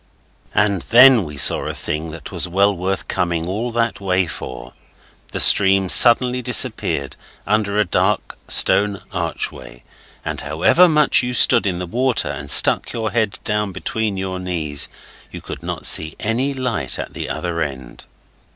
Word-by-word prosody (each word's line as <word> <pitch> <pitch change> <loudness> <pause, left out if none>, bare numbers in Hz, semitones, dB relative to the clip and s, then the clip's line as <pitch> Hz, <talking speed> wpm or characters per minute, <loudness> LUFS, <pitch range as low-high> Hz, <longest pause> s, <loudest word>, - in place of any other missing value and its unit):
And 100 -3 +1
then 125 -3 +5
we 75 -2 -10
saw - - +3
a - - -5
thing 80 +2 -5
that 80 -2 -10
was - - -2
well 100 +3 +1
worth 95 +2 -4
coming 85 -2 -3
all 110 +6 -4
that 115 -3 -2
way 95 -1 0
for; 60 -6 -9 0.6
the - - -4
stream 95 -1 +5
suddenly 125 +3 +5
disappeared 70 - -1 0.3
under 105 0 -1
a 105 - +2
dark 95 +3 -1
stone 100 -2 +3
archway, 80 -8 -6 0.4
and - - -4
however 80 - +2
much 150 -1 +3
you 125 0 -4
stood 105 - +3
in 90 -2 -2
the 90 - -5
water 125 +6 -1
and 70 -2 -8
stuck - - +6
your 110 -2 -4
head 110 -2 -2
down 105 -1 -2
between 110 +1 -4
your 95 -1 -5
knees 80 -6 -3 0.4
you - - -10
could - - -10
not - - -6
see 80 0 +2
any 120 +6 -2
light 130 -3 -4
at - - -7
the - - -6
other 85 -2 -4
end. 65 -4 -7
95 Hz, 160 wpm, -18 LUFS, 85-110 Hz, 0.6 s, stuck